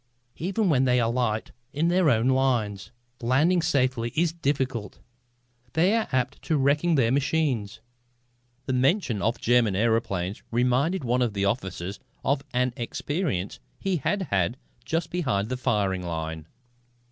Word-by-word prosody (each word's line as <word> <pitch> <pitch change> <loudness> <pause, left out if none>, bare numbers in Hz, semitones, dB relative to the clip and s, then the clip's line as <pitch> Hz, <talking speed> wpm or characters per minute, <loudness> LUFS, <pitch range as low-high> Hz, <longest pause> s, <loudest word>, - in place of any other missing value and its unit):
Even 195 +5 0
when 135 -6 +3
they 125 -1 +3
alight 115 -2 0 0.2
in 155 +4 +1
their 180 -2 +3
own 115 -1 +3
lines, 115 -7 +1 0.3
landing 150 +9 +3
safely 130 -7 +1
is 165 0 +2
difficult. 130 -8 -2 0.8
They 175 +6 +3
are 225 - 0
apt 130 -2 -1
to 160 - +1
wreck 140 +2 +3
their 145 -10 +2
machines." 130 -6 0 0.8
The 130 - -1
mention 130 - +1
of 115 +1 0
German 115 -4 +3
aëroplanes 100 -3 0
reminded 125 +9 +1
one 125 +1 +1
of 115 -4 0
the 100 0 +1
officers 100 -3 -3 0.2
of 140 0 +1
an 125 0 +1
experience 125 - -3 0.2
he 190 -2 -1
had 195 +7 -1
had 100 +5 +1 0.3
just 165 +1 -2
behind 125 - -1
the 130 - -1
firing 105 -7 0
line. 80 -2 -5
125 Hz, 140 wpm, -26 LUFS, 110-150 Hz, 0.8 s, when